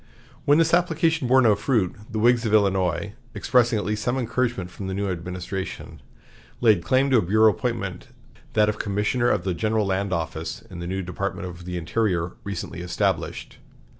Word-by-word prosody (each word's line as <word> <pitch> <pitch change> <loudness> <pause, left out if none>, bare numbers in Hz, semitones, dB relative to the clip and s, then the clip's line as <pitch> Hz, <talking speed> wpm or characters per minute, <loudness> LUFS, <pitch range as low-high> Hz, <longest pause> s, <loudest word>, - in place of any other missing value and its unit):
When 145 +1 +5
this 165 0 +3
application 165 -4 +2
bore 130 +1 +5
no 110 -3 +6
fruit, 105 -2 0 0.2
the 110 - -3
Whigs 120 +2 +4
of 110 -2 +2
Illinois, 95 -2 +1 0.2
expecting 120 -2 +3
at 105 - -2
least 105 +1 -2
some 125 +1 0
encouragement 120 -6 -1
from 95 +1 -7
the 95 - -3
new 100 -1 -1
administration, 90 +2 -6 0.6
laid 110 -8 +4
claim 130 +8 +2
to 130 - +6
a - - +4
bureau 110 +4 +4
appointment, 105 -7 -4 0.5
that 105 -1 +4
of 105 +1 -1
Commissioner 105 +4 0
of 100 -6 +1
the 95 - -1
General 110 +3 0
Land 95 0 -1
Office, 80 -2 -3
in 90 - -8
the 85 - -5
new 95 +1 -2
Department 90 +1 -4
of 90 -1 -10
the 90 0 -4
Interior, 85 0 0
recently 100 -3 -5
established. 90 0 -2
105 Hz, 180 wpm, -24 LUFS, 90-120 Hz, 0.6 s, no